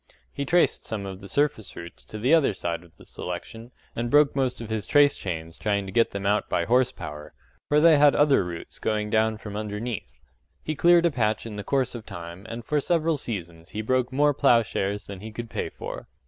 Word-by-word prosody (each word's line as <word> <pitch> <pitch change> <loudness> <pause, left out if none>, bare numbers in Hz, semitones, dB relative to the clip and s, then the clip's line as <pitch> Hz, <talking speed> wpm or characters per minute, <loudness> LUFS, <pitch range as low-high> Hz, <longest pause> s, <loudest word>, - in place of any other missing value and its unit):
He 140 - -3
traced 175 +5 +2
some 105 -3 -3
of 95 0 -7
the 100 - -10
surface 140 -8 0
roots 85 0 -10
to 110 - -8
the 125 +8 +2
other 155 -9 +4
side 85 -2 -3
of 85 -2 -20
the - - -17
selection, 110 +6 -7 0.3
and 120 +1 -2
broke 145 +1 +4
most 130 -3 0
of 115 -1 -7
his 110 -2 -2
trace 145 -1 +5
chains 85 -3 -5
trying 100 -2 0
to 95 - -7
get 115 +3 +3
them 100 0 -5
out 105 +1 +1
by - - 0
horse 125 +1 +3
power 75 -8 -9 0.3
for 150 - +4
they 160 -1 +7
had 145 -1 +6
other 145 -7 +4
roots 85 -2 -8
going 105 -1 -1
down 110 0 +2
from 105 -1 -8
underneath. 105 - -4 0.5
He 155 - -2
cleared 170 +2 +5
a 170 - +3
patch 110 -5 0
in 110 -2 -6
the 105 - -5
course 135 +1 0
of 120 -3 -7
time 85 +4 -8
and 115 0 -6
for 150 - +1
several 165 0 +1
seasons 85 -9 -6
he 110 - -2
broke 130 +2 +1
more 145 +2 +3
ploughshares 105 -5 +2
than 100 -2 -9
he 110 +3 -8
could 115 +1 -7
pay - - -2
for. - - -8
110 Hz, 220 wpm, -26 LUFS, 100-135 Hz, 0.5 s, they